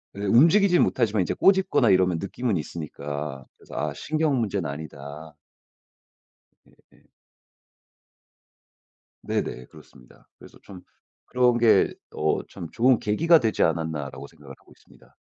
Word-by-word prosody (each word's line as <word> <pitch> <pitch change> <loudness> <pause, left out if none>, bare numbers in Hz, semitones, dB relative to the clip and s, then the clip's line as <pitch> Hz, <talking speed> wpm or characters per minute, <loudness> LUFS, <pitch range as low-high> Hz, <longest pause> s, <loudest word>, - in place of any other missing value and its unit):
예 100 - -7
움직이진 175 - +4
못하지만 110 -5 0
이제 - - -3
꼬집거나 190 -1 +3
이러면 90 -2 +3
느낌은 115 +1 -3
있으니까 75 -3 -6
그래서 - - -14
아 75 +1 -2
신경 155 - -1
문제는 100 -8 -2
아니다. 75 +1 -9 1.3
예예. - - -27 2.2
네네. 65 0 -4
그렇습니다. 60 - -19
그래서 - - -16
좀 95 -2 -13 0.4
그런 125 -1 +2
게 115 -2 +3 0.2
어 75 0 0
참 85 - -9
'좋은 125 +1 +3
계기가 165 +11 +3
되지 110 -5 0
않았나?'라고 80 -4 -3
생각을 - - -14
하고 - - -24
있습니다. - - -23
95 Hz, 300 characters per minute, -24 LUFS, 75-125 Hz, 2.2 s, 움직이진